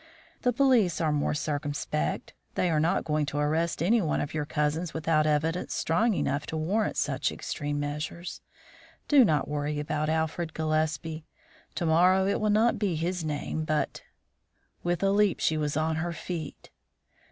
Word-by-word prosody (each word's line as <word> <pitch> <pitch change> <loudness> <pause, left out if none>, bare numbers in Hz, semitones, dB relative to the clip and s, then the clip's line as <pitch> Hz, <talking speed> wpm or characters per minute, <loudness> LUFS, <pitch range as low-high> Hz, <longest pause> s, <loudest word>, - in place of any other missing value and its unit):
The 250 - +2
police 245 -8 +3
are 160 -3 +1
more 150 0 0
circumspect; 145 - -2 0.2
they 180 - +1
are 155 - +2
not 160 +3 +2
going 150 -2 0
to 145 - -3
arrest 155 +2 0
any 225 +6 +4
one 160 -5 0
of 145 - -3
your 150 -2 -2
cousins 155 +3 -1
without 155 -1 +2
evidence 160 +3 0
strong 210 +7 +2
enough 140 -1 -1
to 160 - -3
warrant 195 +8 0
such - - 0
extreme 145 0 -3
measures. 150 +4 -4 0.7
Do 285 -3 +7
not 155 - +2
worry 150 0 -2
about 150 +1 -1
Alfred 160 +1 -1
Gillespie; 155 0 -1 0.5
to 170 - -1
morrow 180 +4 +4
it 200 - 0
will 215 - +2
not 220 +2 +3
be 200 -5 0
his 170 +2 -2
name, 155 +1 -3
but 155 -1 -1 0.4
" - - -44
With 175 +1 0
a 195 - +3
leap 205 -2 +3
she 160 - +2
was 150 -1 -1
on 160 0 0
her 170 +1 -2
feet. 165 -3 -6
160 Hz, 170 wpm, -28 LUFS, 150-175 Hz, 0.7 s, Do